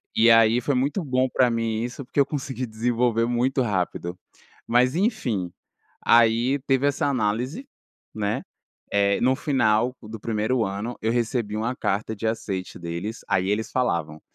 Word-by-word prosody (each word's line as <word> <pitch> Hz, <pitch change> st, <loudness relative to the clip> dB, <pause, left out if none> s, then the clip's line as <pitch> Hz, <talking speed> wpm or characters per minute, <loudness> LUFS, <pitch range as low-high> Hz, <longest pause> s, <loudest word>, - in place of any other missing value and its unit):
E 115 Hz, +2 st, +5 dB
aí 115 Hz, +1 st, +5 dB
foi 140 Hz, +3 st, 0 dB
muito 140 Hz, +9 st, 0 dB
bom 130 Hz, -2 st, +1 dB
para 125 Hz, 0 st, +3 dB
mim 115 Hz, -1 st, -1 dB
isso, 125 Hz, +3 st, -5 dB
porque 135 Hz, -, -3 dB
eu 140 Hz, -, +6 dB
consegui 130 Hz, -3 st, -4 dB
desenvolver 115 Hz, +1 st, +1 dB
muito 125 Hz, +3 st, +1 dB
rápido. 90 Hz, -5 st, -2 dB, 0.5 s
Mas 125 Hz, +3 st, +3 dB
enfim, 135 Hz, -, 0 dB, 0.6 s
aí 120 Hz, +4 st, +4 dB
teve 135 Hz, +1 st, +3 dB
essa 145 Hz, 0 st, 0 dB
análise, 125 Hz, -, -1 dB, 0.5 s
né, 105 Hz, -1 st, -1 dB, 0.5 s
eh, 100 Hz, 0 st, +2 dB
no 130 Hz, +2 st, +4 dB
final 125 Hz, -3 st, +1 dB
do 110 Hz, 0 st, -8 dB
primeiro 110 Hz, +2 st, 0 dB
ano 100 Hz, +5 st, -4 dB
eu 110 Hz, -, 0 dB
recebi 115 Hz, -2 st, -1 dB
uma 115 Hz, +3 st, -1 dB
carta 105 Hz, -1 st, -1 dB
de 110 Hz, +2 st, -3 dB
aceite 100 Hz, -4 st, -3 dB
deles, 85 Hz, +6 st, -5 dB
aí 95 Hz, -1 st, +1 dB
eles 105 Hz, +2 st, -1 dB
falavam: 85 Hz, -11 st, -1 dB
115 Hz, 155 wpm, -24 LUFS, 105-130 Hz, 0.6 s, eu